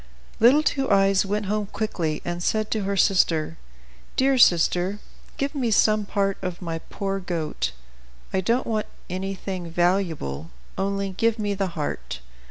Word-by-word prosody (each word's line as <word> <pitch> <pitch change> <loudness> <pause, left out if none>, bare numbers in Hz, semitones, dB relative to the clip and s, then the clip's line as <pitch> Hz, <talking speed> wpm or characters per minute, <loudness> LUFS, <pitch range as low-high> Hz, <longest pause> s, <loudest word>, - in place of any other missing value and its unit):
Little 260 +7 +6
Two 270 -3 0
Eyes 195 -1 +4
went 205 +1 -1
home 210 +1 -1
quickly, 170 -8 -2
and 175 0 -3
said 215 +3 0
to 215 -3 0
her 200 0 -1
sister, 165 -4 +2 0.6
"Dear 270 +1 +3
sister, 180 0 +4 0.4
give 280 +2 -1
me 260 -5 0
some 215 -1 +3
part 195 -1 0
of 180 -1 -4
my 165 -3 -4
poor 195 +3 -3
goat. 170 -4 -2 0.6
I 190 - +2
don't 235 +7 +1
want 215 -2 -1 0.2
anything 185 -1 -4
valuable; 165 - 0 0.3
only 195 0 -1
give 225 +4 +1
me 205 -2 -1
the 190 -4 -3
heart." 145 - -3
195 Hz, 150 wpm, -24 LUFS, 175-215 Hz, 0.6 s, Little